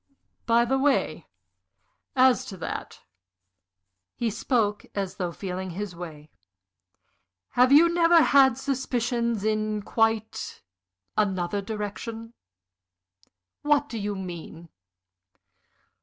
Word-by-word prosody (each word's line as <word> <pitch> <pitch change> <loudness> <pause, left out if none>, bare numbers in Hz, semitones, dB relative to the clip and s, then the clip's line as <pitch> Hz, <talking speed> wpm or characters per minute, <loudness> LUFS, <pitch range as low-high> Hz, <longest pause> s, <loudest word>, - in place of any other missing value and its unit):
"By 235 +1 +4
the 265 +2 +1
way, 275 0 +1 0.9
as 255 -1 +5
to 190 - -8
that" 165 - -6 1.1
he 235 -2 -1
spoke 210 -2 0
as 195 -2 -3
though 180 -3 -2
feeling 185 +1 -5
his 185 +1 -5
way 155 -3 -9 1.2
"have 250 +1 +3
you 310 +4 +8
never 340 -1 +5
had 265 -3 +5
suspicions 240 -5 -1
in 215 -1 -1
quite 225 0 -1 0.5
another 195 -1 0
direction?" 220 +2 -6 1.3
"What 290 -1 +2
do 230 - -4
you 205 0 -3
mean?" 170 -3 -8
220 Hz, 95 wpm, -26 LUFS, 195-255 Hz, 1.3 s, you